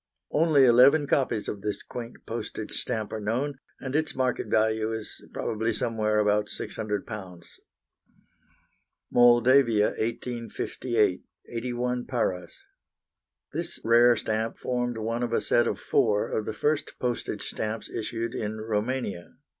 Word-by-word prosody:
Only 150 Hz, -3 st, +5 dB
eleven 130 Hz, +5 st, +6 dB
copies 130 Hz, -6 st, 0 dB
of 100 Hz, -, -4 dB
this 105 Hz, 0 st, -3 dB
quaint 120 Hz, -1 st, -8 dB
postage -, -, -5 dB
stamp 110 Hz, -4 st, -3 dB
are 110 Hz, -, -2 dB
known, 130 Hz, +7 st, -1 dB, 0.2 s
and 130 Hz, 0 st, -4 dB
its 155 Hz, 0 st, 0 dB
market 130 Hz, -1 st, 0 dB
value 110 Hz, 0 st, +2 dB
is 110 Hz, -1 st, -7 dB
probably 115 Hz, +1 st, -1 dB
somewhere 110 Hz, -1 st, 0 dB
about 105 Hz, 0 st, +2 dB
£600. 105 Hz, -5 st, -5 dB, 1.7 s
Moldavia, 120 Hz, -2 st, +5 dB
1858, 115 Hz, -2 st, -1 dB, 0.3 s
81 125 Hz, +1 st, -2 dB
paras. 95 Hz, -8 st, -2 dB, 0.9 s
This -, -, -3 dB
rare 120 Hz, +1 st, +6 dB
stamp 110 Hz, +1 st, -2 dB
formed 125 Hz, -1 st, -2 dB
one 115 Hz, +2 st, -2 dB
of 120 Hz, -, -1 dB
a -, -, +3 dB
set -, -, +2 dB
of -, -, -2 dB
four 105 Hz, 0 st, +1 dB
of 110 Hz, -, -2 dB
the 110 Hz, -, -2 dB
first 150 Hz, +6 st, -1 dB
postage 120 Hz, -2 st, -3 dB
stamps 110 Hz, +1 st, -3 dB
issued 115 Hz, +1 st, -3 dB
in 110 Hz, 0 st, -3 dB
Roumania. 110 Hz, -3 st, -3 dB
115 Hz, 125 wpm, -27 LUFS, 110-125 Hz, 1.7 s, eleven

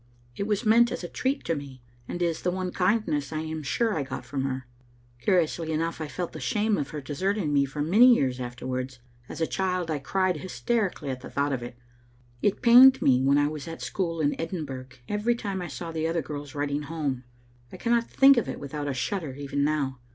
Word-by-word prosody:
It 200 Hz, -, -3 dB
was 210 Hz, +2 st, 0 dB
meant 235 Hz, +2 st, +5 dB
as -, -, -4 dB
a -, -, -3 dB
treat 265 Hz, +9 st, -2 dB
to 165 Hz, -, +1 dB
me, 140 Hz, -4 st, -7 dB, 0.2 s
and 175 Hz, -, -3 dB
is 170 Hz, -2 st, -1 dB
the 180 Hz, -, 0 dB
one 185 Hz, 0 st, -2 dB
kindness 180 Hz, -8 st, 0 dB
I 155 Hz, 0 st, -2 dB
am 160 Hz, 0 st, -4 dB
sure 220 Hz, -, 0 dB
I 155 Hz, -, 0 dB
got 130 Hz, -2 st, -6 dB
from 135 Hz, +2 st, -2 dB
her. 130 Hz, -2 st, -3 dB, 0.5 s
Curiously 165 Hz, +2 st, +1 dB
enough, 165 Hz, +1 st, -2 dB
I 155 Hz, -, -3 dB
felt 175 Hz, +5 st, -4 dB
the 155 Hz, -, -7 dB
shame 210 Hz, -, +1 dB
of 145 Hz, -, -3 dB
her 150 Hz, -, -5 dB
desert 185 Hz, +9 st, -1 dB
ing 150 Hz, -8 st, -1 dB
me 140 Hz, -1 st, +4 dB
for 145 Hz, +2 st, -3 dB
many 230 Hz, +10 st, +7 dB
years 130 Hz, -, 0 dB
afterwards. 125 Hz, +1 st, -4 dB, 0.3 s
As -, -, -7 dB
a -, -, +4 dB
child 180 Hz, -2 st, -1 dB
I 150 Hz, -, -1 dB
cried 185 Hz, +4 st, 0 dB
hysterically 185 Hz, -, -2 dB
at 130 Hz, -1 st, -6 dB
thought 140 Hz, +2 st, -1 dB
of 125 Hz, -, -2 dB
it; 120 Hz, 0 st, -8 dB, 0.6 s
it 205 Hz, -, 0 dB
pained 255 Hz, +3 st, +9 dB
me 130 Hz, -1 st, +4 dB
when 140 Hz, +2 st, +4 dB
I 145 Hz, 0 st, +3 dB
was 150 Hz, +1 st, -6 dB
at 165 Hz, 0 st, -7 dB
school 165 Hz, -4 st, -2 dB
in 145 Hz, -1 st, +2 dB
Edinburgh 145 Hz, -7 st, -5 dB, 0.2 s
every 210 Hz, +3 st, +1 dB
time 200 Hz, -5 st, -4 dB
I 175 Hz, -, -4 dB
saw 170 Hz, -1 st, -6 dB
the 160 Hz, 0 st, -1 dB
other 165 Hz, -1 st, -1 dB
girls 145 Hz, 0 st, -7 dB
writing 145 Hz, 0 st, -1 dB
home; 145 Hz, -4 st, -3 dB, 0.5 s
I -, -, -9 dB
cannot 235 Hz, -1 st, +1 dB
think 275 Hz, 0 st, +6 dB
of 235 Hz, -, +1 dB
it -, -, -5 dB
without 145 Hz, +1 st, -5 dB
a 140 Hz, -, -2 dB
shudder 155 Hz, -1 st, -3 dB
even 140 Hz, 0 st, -2 dB
now. 140 Hz, -3 st, 0 dB
155 Hz, 220 wpm, -27 LUFS, 140-190 Hz, 0.6 s, pained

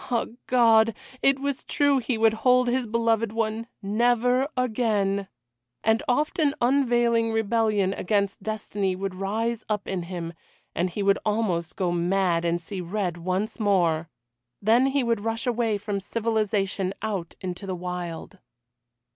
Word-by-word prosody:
Ah! 240 Hz, -2 st, +1 dB, 0.2 s
God! 230 Hz, -3 st, +5 dB, 0.3 s
it 275 Hz, 0 st, +4 dB
was 280 Hz, 0 st, -3 dB
true 285 Hz, -2 st, +2 dB
he 240 Hz, -1 st, -2 dB
would 225 Hz, 0 st, +4 dB
hold 250 Hz, 0 st, +4 dB
his 245 Hz, 0 st, 0 dB
beloved 230 Hz, -1 st, +1 dB
one 225 Hz, 0 st, -2 dB, 0.2 s
never 245 Hz, +5 st, +2 dB
again. 210 Hz, -5 st, 0 dB, 0.6 s
And 220 Hz, +1 st, +3 dB
often 295 Hz, +3 st, +1 dB
unavailing 240 Hz, -3 st, +2 dB
rebellion 215 Hz, -3 st, +1 dB
against 200 Hz, +1 st, -1 dB
destiny 205 Hz, -2 st, -2 dB
would 195 Hz, 0 st, -4 dB
rise 215 Hz, +5 st, -2 dB
up 210 Hz, -2 st, -2 dB
in 190 Hz, -2 st, -2 dB
him, 170 Hz, -1 st, -5 dB, 0.4 s
and 180 Hz, +2 st, 0 dB
he 200 Hz, +3 st, -3 dB
would 200 Hz, 0 st, +3 dB
almost 205 Hz, -6 st, -1 dB
go 180 Hz, -2 st, 0 dB
mad 175 Hz, 0 st, +1 dB
and 170 Hz, 0 st, +1 dB
see 185 Hz, +2 st, -6 dB
red 180 Hz, -1 st, -2 dB
once 185 Hz, +6 st, -2 dB
more. 175 Hz, -6 st, +2 dB, 0.5 s
Then 230 Hz, +6 st, +4 dB
he 270 Hz, 0 st, +1 dB
would 230 Hz, -2 st, +1 dB
rush 225 Hz, +2 st, -3 dB
away 235 Hz, -3 st, +1 dB
from 205 Hz, -1 st, -3 dB
civilisation 205 Hz, -3 st, -1 dB
out 195 Hz, -6 st, -3 dB
into 185 Hz, +1 st, -5 dB
the 185 Hz, -, -2 dB
wild. 180 Hz, +1 st, -6 dB
215 Hz, 145 wpm, -25 LUFS, 190-235 Hz, 0.6 s, God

